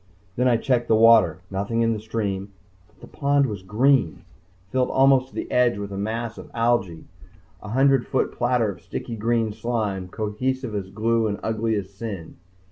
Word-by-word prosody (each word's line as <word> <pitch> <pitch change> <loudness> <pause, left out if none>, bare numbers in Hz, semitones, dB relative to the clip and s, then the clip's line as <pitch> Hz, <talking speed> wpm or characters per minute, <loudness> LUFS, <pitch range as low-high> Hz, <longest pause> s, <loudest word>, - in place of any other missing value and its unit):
Then 125 +1 +2
I 120 -2 +4
checked 120 0 0
the 110 - +4
water. 110 -7 +5
Nothing 100 +4 -1
in 115 0 +2
the 110 - -4
stream, 105 -3 -3 0.4
but 105 - -29
the - - -10
pond 140 0 +1
was 105 -7 -4
green! 110 - +2 0.5
filled 130 -1 +1
almost 135 -1 +4
to - - -19
the - - -5
edge 125 -3 +3
with 100 0 -6
a - - -5
mass 110 +3 -3
of - - -11
algae! 115 -8 0 0.6
A 105 - -9
hundred 135 +1 +3
foot 130 - 0
platter 120 -3 +1
of 85 -3 -13
sticky 115 - -6
green 115 0 0
slime, 105 -5 -2
cohesive 115 +5 -3
as 100 -2 -4
glue 115 +2 +1
and 100 -1 -3
ugly 110 0 0
as 100 -2 -4
sin. 100 -5 -7
115 Hz, 185 wpm, -23 LUFS, 100-120 Hz, 0.6 s, water